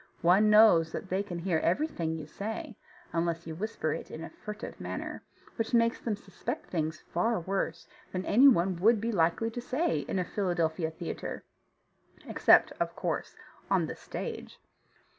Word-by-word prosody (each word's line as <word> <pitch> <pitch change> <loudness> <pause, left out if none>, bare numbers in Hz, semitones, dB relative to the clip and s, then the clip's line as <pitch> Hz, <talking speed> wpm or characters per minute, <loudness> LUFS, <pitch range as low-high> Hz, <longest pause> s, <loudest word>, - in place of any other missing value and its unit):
One 190 +5 +5
knows 210 -7 +6
that 190 - -5
they 190 +2 +1
can 195 -4 -5
hear 170 -2 0
everything 170 - 0
you 155 -2 -6
say, 215 +7 -6 0.4
unless 170 0 -1
you 160 - -5
whisper 165 -4 -2
it - - -6
in 160 - -7
a - - -8
furtive 210 0 -8
manner, - - -5 0.4
which 225 +1 0
makes 230 0 +3
them 225 -3 -2
suspect 195 -2 -6
things 160 -2 -2
far 225 +6 +1
worse 190 +3 -3 0.2
than 185 0 -3
any 255 +7 +6
one 185 -7 +4
would 220 +5 +4
be 230 +3 -1
likely 180 +4 +1
to 245 - -5
say 295 +7 0
in - - -3
a 180 - 0
Philadelphia 170 -4 0
theatre, 160 - -6 0.8
except, - - +5
of - - -1
course, - - -3 0.3
on - - +3
the - - -5
stage. - - -6
190 Hz, 165 wpm, -30 LUFS, 165-220 Hz, 0.8 s, knows